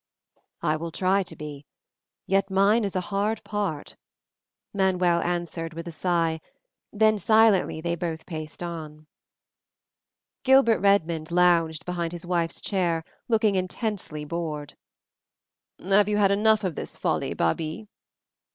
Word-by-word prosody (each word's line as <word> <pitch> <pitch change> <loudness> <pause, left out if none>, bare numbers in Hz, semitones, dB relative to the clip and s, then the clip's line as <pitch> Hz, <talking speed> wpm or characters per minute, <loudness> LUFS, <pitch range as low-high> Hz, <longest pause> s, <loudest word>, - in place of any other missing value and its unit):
"I 155 +1 +1
will 165 +2 -5
try 190 +4 +1
to 175 -3 -7
be, 150 -2 -9 0.6
yet 195 +1 +1
mine 200 +4 +3
is 200 -2 -3
a 185 - +1
hard 210 +3 0
part," 200 -8 -3 0.8
Manuel 180 -3 +2
answered 170 -2 -3
with 165 +1 -6
a - - -5
sigh, 165 -1 0 0.5
then 215 0 +3
silently 215 -5 +3
they 170 +1 -1
both 165 -2 -4
paced 155 -1 -7
on. 155 -3 -7 1.4
Gilbert 265 -4 +5
Redmond 170 -6 +2
lounged 170 -2 +2
behind 175 -1 -3
his 175 0 -7
wife's 170 -2 -1
chair, 170 -4 0 0.2
looking 220 -3 +2
intensely 185 -4 -3
bored. 155 -2 -5 1.0
"Have 200 +2 +3
you 210 - +1
had 200 -2 +4
enough 215 +1 +3
of 185 -3 -1
this - - -6
folly, - - -1
Babie?" 155 - -1
175 Hz, 130 wpm, -25 LUFS, 165-200 Hz, 1.4 s, Gilbert